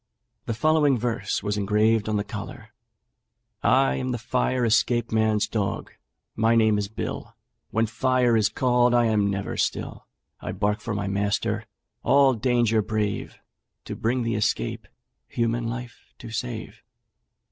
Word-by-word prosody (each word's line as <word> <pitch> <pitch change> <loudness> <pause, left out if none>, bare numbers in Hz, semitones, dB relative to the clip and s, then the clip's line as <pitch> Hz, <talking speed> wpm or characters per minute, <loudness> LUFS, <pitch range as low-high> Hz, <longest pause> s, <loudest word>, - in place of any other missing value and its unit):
The 115 - -1
following 150 +1 +3
verse 115 -4 -2
was 105 0 -1
engraved 105 +2 +2
on 110 - 0
the 100 - 0
collar: 105 +2 -8 0.9
'I 130 +3 +3
am 130 0 -2
the - - -2
fire 125 +1 0
escape 120 +1 +2
man's 110 -1 +2
dog: 100 -3 -3 0.4
my 115 +1 +3
name 110 -2 +4
is 100 - -2
Bill. 110 - -6 0.3
When 110 +1 +1
'fire' 125 +2 +2
is 105 -2 +3
called 125 +1 +2
I 120 -1 +4
am 105 -3 +2
never 100 0 -3
still: - - -2 0.3
I - - -5
bark 105 +2 -1
for 115 -2 -3
my 100 0 -2
master, 100 +1 -1 0.4
all 135 +1 +4
danger 120 -1 +2
brave, 105 -1 -2 0.5
To - - -5
bring 120 +2 0
the 115 0 -1
escape 105 - -1 0.4
human 115 0 -1
life 120 0 -8
to 115 -3 -10
save.' 115 -1 -5
115 Hz, 145 wpm, -25 LUFS, 105-120 Hz, 0.9 s, name